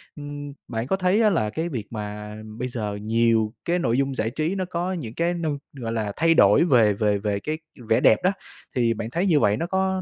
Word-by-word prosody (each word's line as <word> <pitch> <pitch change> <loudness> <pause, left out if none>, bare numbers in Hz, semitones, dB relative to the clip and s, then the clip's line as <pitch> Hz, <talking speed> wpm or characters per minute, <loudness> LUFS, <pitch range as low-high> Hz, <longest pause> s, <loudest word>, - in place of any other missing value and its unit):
ưm, 145 -1 -7
bạn 115 +2 -3
có 190 - +2
thấy 190 +4 +2
á 215 - +5
là 135 - +1
cái 160 +9 -3
việc 115 -9 -5
mà 105 -1 -6 0.2
bây 125 +1 -2
giờ 105 -4 -4
nhiều 115 0 +2
cái 175 +1 +1
nội 120 -7 +1
dung 135 -1 0
giải 110 -1 0
trí 155 +8 -2
nó 185 -1 -1
có 180 +1 -2
những 120 -11 -5
cái 170 +4 0
nư 165 -3 -2 0.2
gọi 120 -4 -5
là, 105 -3 -2
thay 165 +1 +4
đổi 105 -1 +6
về 115 - +4
về 105 0 +1
về 100 -1 -1
cái 155 +7 -3 0.3
vẻ 110 - +4
đẹp 110 - +5
đó, 185 - +4 0.4
thì 120 -2 +2
bạn 110 +1 -5
thấy 175 +8 -1
như 160 -7 +4
vậy 105 -2 +3
nó 170 - -2
có 190 0 0
125 Hz, 240 wpm, -24 LUFS, 110-170 Hz, 0.4 s, đổi